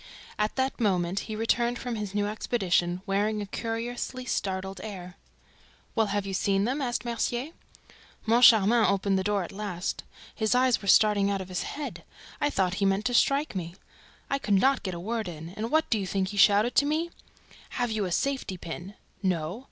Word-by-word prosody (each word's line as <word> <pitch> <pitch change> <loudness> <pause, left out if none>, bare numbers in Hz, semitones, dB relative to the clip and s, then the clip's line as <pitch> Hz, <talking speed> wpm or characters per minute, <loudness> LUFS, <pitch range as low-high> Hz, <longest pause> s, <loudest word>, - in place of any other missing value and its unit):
At 210 0 0
that 265 0 -1
moment 185 -3 +1
he 215 - -3
returned 235 +2 +1
from 245 0 -4
his 205 -2 -5
new 205 0 +1
expedition, 190 -4 0
wearing 210 +2 0
a 205 - -3
curiously 235 +4 -4
startled 190 -4 -3
air. 185 -4 -7 0.8
"Well, 220 -2 +2
have 200 0 -1
you 195 - -4
seen 195 +1 +1
them?" 260 +7 -1
asked 240 -3 -2
Mercier. 240 +4 -2 0.7
"Moncharmin 225 -1 +6
opened 195 -1 +2
the - - -1
door 205 -1 0
at 170 - -8
last. 195 -3 -4 0.3
His 220 +2 +1
eyes 250 -2 +3
were 200 - -8
starting 205 -1 +5
out 200 -1 0
of 190 -1 -7
his 180 - -2 0.2
head. 295 -1 -6 0.4
I 290 - +3
thought 185 -6 0
he - - +3
meant 195 +2 +1
to 245 - 0
strike 275 +5 +2
me. 170 -2 -4 0.5
I 275 - -1
could 205 -6 +1
not 265 +7 +3
get 185 -3 -4
a - - -6
word 220 +3 -3
in; 165 -1 -7
and 215 +5 -4
what 315 +2 +2
do 220 - +3
you 195 - -3
think 190 0 -1
he 205 - -6
shouted 205 +7 +5
at 285 - -2
me? 320 +3 -1 0.6
'Have 245 -2 -2
you 215 -2 -1
a 180 - -4
safety 265 -3 -1
pin?' 175 +4 -7 0.3
'No!' 180 0 -1
210 Hz, 195 wpm, -27 LUFS, 190-240 Hz, 0.8 s, Moncharmin